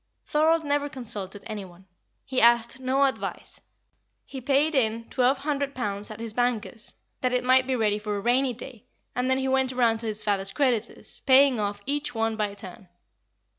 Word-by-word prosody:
Thorold 320 Hz, +2 st, +2 dB
never 290 Hz, 0 st, 0 dB
consulted 210 Hz, -7 st, -6 dB
any 210 Hz, -2 st, -5 dB
one; 180 Hz, 0 st, -15 dB, 0.4 s
he 260 Hz, -1 st, 0 dB
asked 235 Hz, +2 st, +4 dB
no 260 Hz, +2 st, +1 dB
advice; 270 Hz, -, -4 dB, 0.6 s
he 265 Hz, -, -8 dB
paid 280 Hz, +5 st, +2 dB
in 230 Hz, -4 st, 0 dB
twelve 260 Hz, +1 st, +2 dB
hundred 280 Hz, 0 st, -2 dB
pounds 205 Hz, -4 st, -3 dB
at 215 Hz, 0 st, -9 dB
his 230 Hz, -1 st, -5 dB
banker's, 240 Hz, -1 st, -2 dB, 0.2 s
that 255 Hz, -1 st, 0 dB
it 250 Hz, 0 st, +1 dB
might 255 Hz, +1 st, +4 dB
be 260 Hz, -, +1 dB
ready 210 Hz, -3 st, +1 dB
for 210 Hz, -1 st, -3 dB
a -, -, -2 dB
rainy 245 Hz, +4 st, +2 dB
day, 245 Hz, -1 st, -9 dB, 0.3 s
and 250 Hz, +1 st, 0 dB
then 260 Hz, -, +3 dB
he 265 Hz, 0 st, -1 dB
went 265 Hz, -1 st, +2 dB
around 235 Hz, -3 st, +2 dB
to 225 Hz, -, -4 dB
his 215 Hz, -1 st, -2 dB
father's 195 Hz, -2 st, +1 dB
creditors, 255 Hz, -7 st, -1 dB
paying 265 Hz, -2 st, +6 dB
off 205 Hz, -1 st, -2 dB
each 290 Hz, -2 st, -1 dB
one 225 Hz, 0 st, 0 dB
by 210 Hz, -2 st, -2 dB
turn. 190 Hz, 0 st, -11 dB
245 Hz, 185 wpm, -26 LUFS, 215-265 Hz, 0.6 s, paying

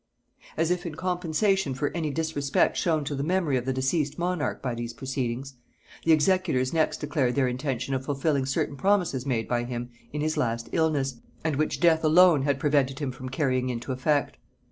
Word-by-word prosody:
As 165 Hz, +2 st, +1 dB
if 180 Hz, 0 st, -1 dB
in 155 Hz, -, -6 dB
compensation 180 Hz, -2 st, 0 dB
for 145 Hz, +4 st, -2 dB
any 160 Hz, -3 st, -1 dB
disrespect 145 Hz, -2 st, 0 dB
shown 160 Hz, -3 st, +1 dB
to 145 Hz, -, -3 dB
the 140 Hz, -, -2 dB
memory 165 Hz, -2 st, +1 dB
of 125 Hz, -1 st, -1 dB
the 135 Hz, -, 0 dB
deceased 140 Hz, +3 st, 0 dB
monarch 175 Hz, -3 st, -1 dB
by 125 Hz, -2 st, -3 dB
these 120 Hz, 0 st, -5 dB
proceedings, 130 Hz, +1 st, -3 dB, 0.5 s
the 165 Hz, -, +4 dB
executors 155 Hz, -5 st, +2 dB
next 160 Hz, -1 st, +1 dB
declared 145 Hz, -5 st, 0 dB
their 135 Hz, -2 st, +3 dB
intention 130 Hz, 0 st, -2 dB
of 130 Hz, 0 st, -1 dB
fulfilling 140 Hz, -1 st, 0 dB
certain 140 Hz, +1 st, -1 dB
promises 175 Hz, -7 st, +1 dB
made 115 Hz, -4 st, 0 dB
by 120 Hz, -1 st, 0 dB
him 120 Hz, 0 st, -5 dB, 0.2 s
in 150 Hz, -, -3 dB
his 155 Hz, +1 st, -1 dB
last 115 Hz, -1 st, -1 dB
illness, 145 Hz, -6 st, +1 dB, 0.3 s
and 160 Hz, -2 st, 0 dB
which 155 Hz, +2 st, 0 dB
death 165 Hz, -2 st, +4 dB
alone 165 Hz, -1 st, +6 dB
had 140 Hz, 0 st, 0 dB
prevented 140 Hz, -2 st, +1 dB
him 140 Hz, -3 st, -2 dB
from 130 Hz, +1 st, -8 dB
carrying 130 Hz, -2 st, 0 dB
into 125 Hz, +2 st, -4 dB
effect. 140 Hz, +2 st, 0 dB
140 Hz, 190 wpm, -26 LUFS, 130-160 Hz, 0.5 s, alone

